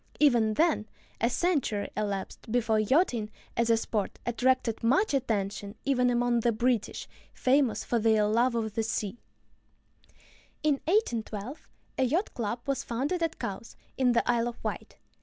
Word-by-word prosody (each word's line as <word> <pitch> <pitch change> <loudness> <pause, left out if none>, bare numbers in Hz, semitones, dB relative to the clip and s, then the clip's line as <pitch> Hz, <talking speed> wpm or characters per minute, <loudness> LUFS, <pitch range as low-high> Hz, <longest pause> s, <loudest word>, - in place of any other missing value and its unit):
Even 235 -7 +4
then, 310 -9 +2 0.3
a 235 - +3
century 265 - 0
elapsed 205 +1 -4
before 225 -2 +2
yachting 235 - +2 0.3
as 235 0 +1
a 230 - +5
sport 215 -2 -2
attracted 240 -1 +1
much 285 - +3
attention 205 -5 -1
even 250 -3 +3
among 240 0 +2
the 235 +1 +2
British, 235 0 -1 0.3
famous 260 -2 +2
for 235 - 0
their 220 -1 +3
love 235 +4 +2
of 220 -2 -2
the 225 - 0
sea. 220 0 -3 1.4
In 295 -2 +2
1812 245 - -1 0.3
a - - +4
"yacht 330 - 0
club" 235 +1 -3
was 275 -1 -1
founded 280 +10 -2
at 330 -2 -1
Cowes, 200 +3 -6 0.2
in 250 -2 +3
the 235 - +1
Isle 235 -1 +2
of 240 - -7
Wight. - - -5
235 Hz, 150 wpm, -29 LUFS, 220-265 Hz, 1.4 s, a